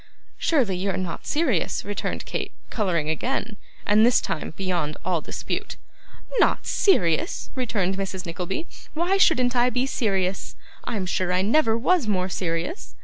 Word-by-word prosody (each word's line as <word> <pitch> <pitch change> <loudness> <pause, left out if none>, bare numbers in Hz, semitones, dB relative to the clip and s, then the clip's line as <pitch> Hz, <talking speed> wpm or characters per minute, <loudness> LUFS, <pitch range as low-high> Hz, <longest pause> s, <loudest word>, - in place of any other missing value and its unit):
'Surely 255 - +2
you 190 +3 -1
are 190 - -1
not 185 -3 -4
serious,' 285 - 0
returned 205 0 -3
Kate, - - -3 0.2
colouring 180 -8 0
again; 220 - -1 0.3
and 210 +1 +5
this 240 +1 +5
time - - -3
beyond 175 -6 -1
all 175 -4 +1
dispute. - - -4 0.6
'Not - - +3
serious!' 310 - +2
returned 205 -8 -1
Mrs. 190 -2 -4
Nickleby; 180 - -3 0.3
'why 350 +5 +2
shouldn't 255 -10 +4
I 245 0 +4
be 250 +1 0
serious? 195 -8 -1 0.3
I'm 205 -5 -2
sure 185 0 0
I 180 +1 +2
never 225 +1 +3
was 290 +2 +2
more 185 -3 +1
serious. 175 - -3
200 Hz, 145 wpm, -24 LUFS, 180-250 Hz, 0.6 s, and